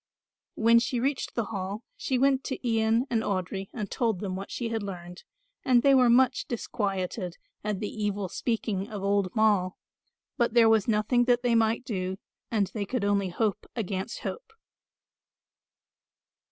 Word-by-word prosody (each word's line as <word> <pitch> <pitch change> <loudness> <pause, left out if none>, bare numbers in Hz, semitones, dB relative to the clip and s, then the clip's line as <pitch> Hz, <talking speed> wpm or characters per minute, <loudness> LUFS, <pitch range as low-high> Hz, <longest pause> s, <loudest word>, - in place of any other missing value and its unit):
When 230 +1 +5
she 245 +1 -1
reached 270 +2 -1
the 230 - +1
Hall 200 +3 -4
she 260 - -1
went 270 +1 +3
to 265 -2 -4
Ian 225 +1 +2
and 230 -2 +2
Audry 195 -1 -3
and 210 -5 -5
told 225 -6 0
them 190 -2 -3
what 195 +1 -6
she 235 -2 -3
had 225 -1 -2
learned, 180 -3 -7 0.4
and 250 -3 +4
they 275 - +6
were 255 -2 +5
much 255 +1 +3
disquieted 195 -5 -3 0.3
at 210 -2 -2
the 210 - -1 0.2
evil 205 -1 -1
speaking 215 0 -2
of 205 -3 -6
old 200 -1 +2
Moll; 205 -5 +2 0.6
but 235 -2 +1
there 230 -1 +7
was 220 -3 +3
nothing 225 +3 +2
that 245 0 +3
they 245 -1 +2
might 225 +2 +2
do 190 -5 -3 0.3
and 210 -3 +2
they 210 - -2
could 245 -3 -1
only 200 -2 +1
hope 210 +3 -1
against 200 -1 -3
hope. 485 -2 -6
220 Hz, 165 wpm, -28 LUFS, 195-240 Hz, 0.6 s, there